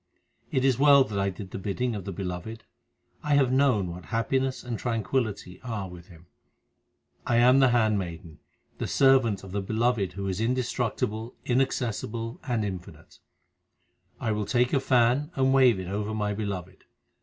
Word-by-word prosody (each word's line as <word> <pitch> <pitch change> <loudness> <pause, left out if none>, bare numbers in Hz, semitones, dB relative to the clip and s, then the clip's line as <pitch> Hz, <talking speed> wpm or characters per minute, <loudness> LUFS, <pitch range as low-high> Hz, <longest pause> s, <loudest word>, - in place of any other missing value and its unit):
It 130 0 +1
is 130 -2 +2
well 140 -1 +7
that 105 -5 -4
I 100 0 +1
did 95 0 -8
the - - -5
bidding 115 +6 -2
of 100 -3 -6
the 100 - -4
Beloved; 95 +4 -6 0.6
I 150 -1 +1
have 135 -3 +3
known 130 -9 +2
what 85 +1 -9
happiness 130 +3 -1
and 120 -3 -4
tranquillity 110 -5 -2
are 110 -6 -4
with 90 -1 -12
Him. 85 -1 -16 1.0
I 120 - +2
am 125 +3 +6
the 135 -1 +5
handmaiden, 95 -9 -1 0.4
the - - -2
servant 130 -8 +3
of 95 - -10
the 100 +1 -2
Beloved 110 -2 0
Who 100 +1 -4
is 95 +2 -2
indestructible, 120 -1 -2
inaccessible, 120 -2 -1
and 115 -4 0
infinite. 95 -3 -8 1.0
I 110 - -1
will 105 -1 -2
take 120 +3 +1
a 140 - +4
fan 130 +3 +2
and 135 0 +2
wave 125 -6 +5
it 95 - -6
over 105 +3 -3
my 105 -1 -1
Beloved. 95 -3 -5
110 Hz, 165 wpm, -27 LUFS, 100-125 Hz, 1.0 s, well